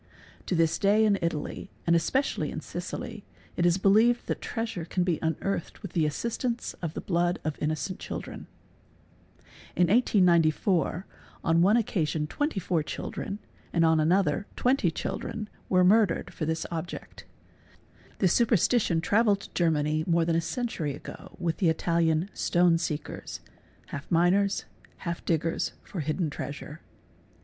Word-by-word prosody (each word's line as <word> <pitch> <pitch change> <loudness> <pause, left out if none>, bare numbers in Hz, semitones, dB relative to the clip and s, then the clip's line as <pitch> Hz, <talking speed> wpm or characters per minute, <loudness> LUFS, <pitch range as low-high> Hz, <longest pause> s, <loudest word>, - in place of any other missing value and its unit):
To 185 - 0
this 165 -1 +2
day 210 +2 +4
in 200 -2 +3
Italy, 170 +2 -3 0.2
and 170 - +4
especially 260 +12 0
in - - -5
Sicily, - - -6 0.3
itis 175 0 +3
believed 220 +5 +4
that - - -3
treasure 225 -7 -3
can 180 +2 -1
be 175 -4 0
unearthed 170 +5 -2
with 200 - -7
the 160 -3 +2
assistance 235 - -2
of 165 -2 -4
the - - -3
blood 175 -1 +1
of 155 -1 -2
innocent 155 +5 -2
children. - - -7 1.3
In 175 -1 +3
1894, 180 -4 +3 0.4
on 165 +1 +3
one 200 +6 +5
occasion 160 -8 0
24 185 - -1
children, 200 +5 -5 0.3
and 165 -1 +3
on 160 -1 +4
another 175 +3 +2
20 250 -8 +2
children, 210 +5 -4 0.2
were 185 -1 +4
murdered 195 -1 +3
for 155 - -3
this 160 0 -1
object. 165 +1 -6 0.9
This 185 -3 +3
super 235 -1 +4
stition 190 -4 +2
travelled 205 +1 +3
to - - -12
Germany 155 -2 +1
more 170 -1 +3
than 165 0 +1
a 165 - +2
century 170 - -3
ago - - -11
with 170 -3 -1
the 180 - +3
Italian 165 +1 +1
| - - -31
"'stone 175 -1 +3
seekers'' 150 -2 -4 0.5
(half 140 +1 -7
miners, 180 +4 +2 0.4
half 170 -1 -3
diggers 165 0 0
for 185 - -7
hidden 155 +1 -1
treasure). 150 +2 -7
175 Hz, 145 wpm, -28 LUFS, 160-200 Hz, 1.3 s, one